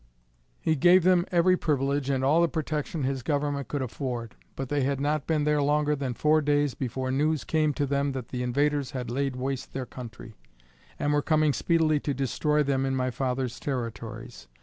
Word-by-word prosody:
He 160 - +1
gave 175 +5 +5
them 180 0 +4
every 180 +1 +4
privilege 140 -4 0
and 135 -1 0
all 150 +5 +4
the 170 - +4
protection 155 0 -3
his 135 0 -1
government 145 0 -1
could 145 -2 -2
afford. 120 -3 -4 0.2
But 135 - -4
they 145 +2 0
had 135 +1 0
not 145 +1 -1
been 155 -2 +1
there 150 0 +2
longer 150 +1 +2
than 135 -4 -3
four 155 +3 +3
days 145 -2 +1
before 130 0 -3
news 150 +3 +1
came 155 -1 +1
to 145 - 0
them 140 0 0
that 130 -3 -6
the 125 - -4
invaders 140 +2 0
had 125 -2 -4
laid 135 +1 -1
waste 130 +1 -4
their 130 -1 -3
country, 120 -2 -10 0.6
and 145 - 0
were 145 - +3
coming 155 -1 +2
speedily 160 -2 +2
to 145 -1 -2
destroy 150 +3 +1
them 135 -1 0
in 135 0 0
my 130 0 0
father's 125 -1 -2
territories. 115 -2 -5
140 Hz, 195 wpm, -27 LUFS, 130-150 Hz, 0.6 s, gave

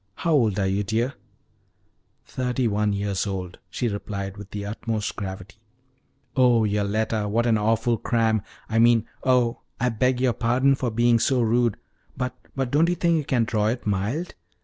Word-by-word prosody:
How 170 - -1
old 115 -9 +3
are 100 - +1
you, 95 +2 0
dear?" 115 +6 -1 1.1
"Thirty 125 -1 -1
one 105 0 +1
years 100 0 -1
old," 90 -2 -5
she 125 - -2
replied, 100 -2 -4
with 100 -1 -10
the 100 0 -5
utmost 110 0 -3
gravity. 95 0 -7 0.8
"Oh, 125 -3 +4
Yoletta, 105 +1 0
what 115 +3 +1
an 115 -2 +3
awful 115 +2 +1
cram! 110 -2 +1 0.3
I 115 0 0
mean 115 -1 +5 0.2
oh, 125 -2 +2 0.2
I 125 - +2
beg 125 +2 +1
your 125 -2 +2
pardon 125 +4 +2
for 130 -2 -1
being 120 +1 +3
so 130 +2 +2
rude! 115 -1 +2 0.4
But 125 -1 -2 0.2
but 135 -2 -2
don't 160 +4 +3
you 175 - +1
think 170 -1 +2
you 150 - -2
can 125 -4 +2
draw 110 -2 0
it 120 +3 -2
mild? 105 - -1
115 Hz, 170 wpm, -24 LUFS, 105-125 Hz, 1.1 s, mean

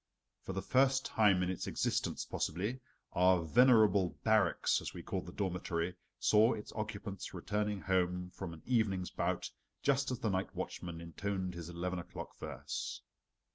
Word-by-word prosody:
For 95 - -5
the 95 +1 -3
first 135 +2 +3
time 100 -4 +4
in 90 - 0
its 95 - -4
existence - - -1
possibly, 105 +10 -2 0.3
our 90 -1 +4
venerable 105 - +5
"barracks," 110 -2 +3
as - - -6
we - - -7
called - - -3
the - - -6
dormitory, 90 -2 -2 0.2
saw 110 +3 +5
its 105 - -7
occupants 105 -3 -5
returning 105 -1 -1
home 90 -1 0
from 90 -1 -6
an 80 -1 -11
evening's 105 -7 +1
bout - - -1 0.3
just 140 -1 +2
as 125 - -1
the 110 -3 -1
night 95 0 -2
watchman 85 -1 -5
intoned 95 +3 -3
his 85 -1 -7
eleven 90 +1 -3
o'clock 85 - -8
verse. - - -5
95 Hz, 155 wpm, -34 LUFS, 90-110 Hz, 0.3 s, venerable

